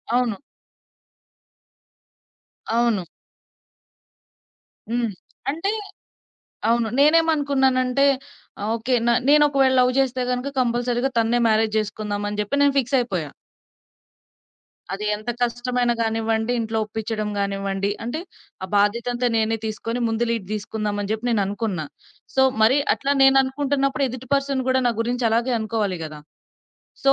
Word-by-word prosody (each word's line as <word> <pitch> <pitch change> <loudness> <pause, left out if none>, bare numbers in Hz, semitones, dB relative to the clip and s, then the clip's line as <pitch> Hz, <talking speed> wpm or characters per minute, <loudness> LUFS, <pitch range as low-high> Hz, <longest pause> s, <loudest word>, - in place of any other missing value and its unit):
అవును. 240 -5 +1 2.4
అవును. 235 -5 +2 1.9
హ్మ్. 235 -2 0 0.4
అంటే 335 +7 -2 1.0
అవును. 235 -1 +2
నేనేమనుకున్నానంటే 280 -4 +3 0.7
ఓకే. 245 +3 0
న - - +5 0.2
నేనొకవేళ 285 -3 +5
లవ్ 250 0 +4
జేస్తే 260 -1 +1
గనక 250 +3 -2
కంపల్సరీగా 245 +1 0
తన్నే 230 +2 +2
మ్యారేజ్ 220 0 +2
జేసుకుందాం 210 -1 -3
అని 210 0 -5
జెప్పి 280 +8 -1
నేను 280 -1 +3
ఫిక్సయిపోయా. 235 - -1 1.6
అది 205 +2 -4
ఎంత 215 +3 -5
కష్టమైన 245 0 0
గానివ్వండి, 225 +1 0
ఇంట్లో 225 0 -2
ఒప్పించడం 215 0 -4
గానివ్వండి, 195 0 -1
అంటే 255 +8 -3 0.4
ఆ - - -4
బాధ్యతంతా 235 +4 +1
నేనే 225 0 +1
తీసుకొని 230 +3 -3
ముందు 225 +1 0
లీడ్ 225 -5 -2
దీసుకుందాం 210 0 -3
అని 200 - -5
జెప్పి 220 +3 -3
నేననుకున్నా. 200 -5 -1 0.5
సో, 265 - +4 0.2
మరి 255 +6 +5 0.2
అట్లా 280 +1 -1
నేను 270 0 +6
అనుకుంటున్నప్పుడు 275 +1 0
ఎదుటి 255 +1 -8
పర్సన్ 275 -2 0
గూడా 260 0 +2
నా - - +1
గురించి 240 +1 0
అలాగే 240 +3 +1
అనుకోవాలి 210 -4 -1
గదా! 155 -1 -8 0.8
సో 275 - +6
235 Hz, 115 wpm, -22 LUFS, 215-260 Hz, 2.4 s, నేను